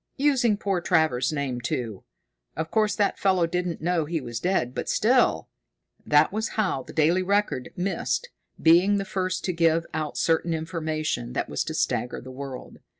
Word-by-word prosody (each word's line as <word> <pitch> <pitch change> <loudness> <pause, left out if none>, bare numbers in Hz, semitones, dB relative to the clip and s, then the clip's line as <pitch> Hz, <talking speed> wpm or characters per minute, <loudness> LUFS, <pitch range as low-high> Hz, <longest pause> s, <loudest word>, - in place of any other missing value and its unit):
Using 260 -7 +3
poor 195 -3 -1
Travers's 155 -7 +2
name, 140 -5 -2
too! 115 -4 -3 0.5
Of 160 0 -3
course 215 -1 +2
that 205 -2 0
fellow 185 -3 +3
didn't 180 -1 -3
know 170 -2 +1
he 165 +1 -2
was 120 -4 -5
dead, 175 -9 0
but - - -4
still...." - - +3 0.6
That 150 +4 +4
was 220 +2 -3
how 190 -11 +1
The - - -11
Daily 165 +4 +3
Record 200 -8 0
missed 195 - -2 0.3
being 180 +5 +5
the 195 - -2
first 185 -1 -2
to 185 - 0
give 165 0 +2
out 155 -1 -3
certain 165 0 +1
information 155 - -3
that - - -2
was - - -1
to - - -4
stagger 125 - -1
the 130 - -10
world. 130 -1 -8
165 Hz, 170 wpm, -25 LUFS, 145-190 Hz, 0.6 s, being